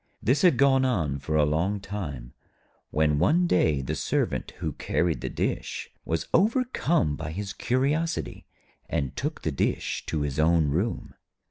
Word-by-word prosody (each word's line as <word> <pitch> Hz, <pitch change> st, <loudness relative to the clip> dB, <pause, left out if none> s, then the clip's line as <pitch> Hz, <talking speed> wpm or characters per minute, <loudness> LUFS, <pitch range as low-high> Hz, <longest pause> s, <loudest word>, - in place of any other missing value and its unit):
This 130 Hz, +7 st, +2 dB
had 175 Hz, -9 st, +5 dB
gone 135 Hz, -1 st, +4 dB
on 80 Hz, -, 0 dB
for 75 Hz, +3 st, -3 dB
a 75 Hz, -1 st, +4 dB
long 85 Hz, +7 st, 0 dB
time, 75 Hz, -12 st, -6 dB, 0.6 s
when 75 Hz, -1 st, +2 dB
one 165 Hz, -, +3 dB
day 80 Hz, -, +2 dB
the -, -, -3 dB
Servant -, -, -1 dB
who -, -, -3 dB
carried 80 Hz, -8 st, -1 dB
the 65 Hz, -, -3 dB
dish -, -, -3 dB
was 80 Hz, 0 st, -1 dB
overcome 190 Hz, -, +2 dB
by 80 Hz, +1 st, -5 dB
his 100 Hz, +4 st, -5 dB
curiosity, 145 Hz, +9 st, -1 dB, 0.4 s
and 70 Hz, -6 st, -2 dB
took -, -, -4 dB
the -, -, 0 dB
dish -, -, -1 dB
to 75 Hz, -, -1 dB
his 75 Hz, -1 st, -2 dB
own 80 Hz, -1 st, +3 dB
room. 95 Hz, +11 st, -2 dB
85 Hz, 155 wpm, -26 LUFS, -, 0.6 s, had